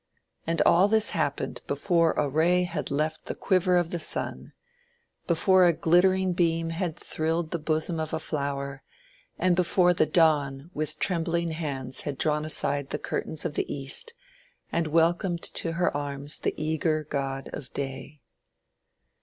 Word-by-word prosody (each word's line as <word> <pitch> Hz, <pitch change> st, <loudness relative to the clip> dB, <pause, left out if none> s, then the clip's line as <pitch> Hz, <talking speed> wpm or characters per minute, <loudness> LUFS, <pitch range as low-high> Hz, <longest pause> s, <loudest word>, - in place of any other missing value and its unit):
And 165 Hz, 0 st, +2 dB
all 180 Hz, +4 st, +5 dB
this 220 Hz, 0 st, +3 dB
happened 145 Hz, -4 st, -2 dB
before 165 Hz, +3 st, +2 dB
a 150 Hz, -, 0 dB
ray 170 Hz, +6 st, +2 dB
had 175 Hz, -1 st, -3 dB
left 155 Hz, +2 st, -2 dB
the -, -, -3 dB
quiver 185 Hz, -1 st, +2 dB
of 175 Hz, -1 st, 0 dB
the 175 Hz, -, -1 dB
sun, 155 Hz, -, -3 dB, 0.8 s
before 185 Hz, +2 st, +4 dB
a 175 Hz, -1 st, +5 dB
glittering 180 Hz, +3 st, +3 dB
beam 165 Hz, -1 st, +1 dB
had 170 Hz, -1 st, -3 dB
thrilled 160 Hz, +1 st, -1 dB
the 170 Hz, -, -1 dB
bosom 160 Hz, +2 st, -1 dB
of 155 Hz, -1 st, -3 dB
a -, -, -1 dB
flower, 140 Hz, -2 st, -3 dB, 0.6 s
and 180 Hz, 0 st, +2 dB
before 180 Hz, 0 st, +3 dB
the 155 Hz, -2 st, +2 dB
Dawn 150 Hz, -2 st, +2 dB
with 155 Hz, 0 st, -2 dB
trembling 170 Hz, -2 st, 0 dB
hands 135 Hz, -5 st, -3 dB
had 145 Hz, -3 st, -4 dB
drawn 150 Hz, 0 st, 0 dB
aside 145 Hz, -2 st, -1 dB
the -, -, -1 dB
curtains 155 Hz, -, -4 dB
of -, -, -2 dB
the -, -, -1 dB
East 145 Hz, -, -1 dB, 0.6 s
and 170 Hz, -1 st, 0 dB
welcomed 170 Hz, +3 st, +1 dB
to 165 Hz, -, -1 dB
her 175 Hz, -2 st, 0 dB
arms 145 Hz, 0 st, -3 dB
the -, -, -1 dB
eager 155 Hz, 0 st, 0 dB
god 135 Hz, -2 st, -4 dB
of 140 Hz, -3 st, -7 dB
Day. 140 Hz, +2 st, -6 dB
160 Hz, 155 wpm, -27 LUFS, 145-175 Hz, 0.8 s, all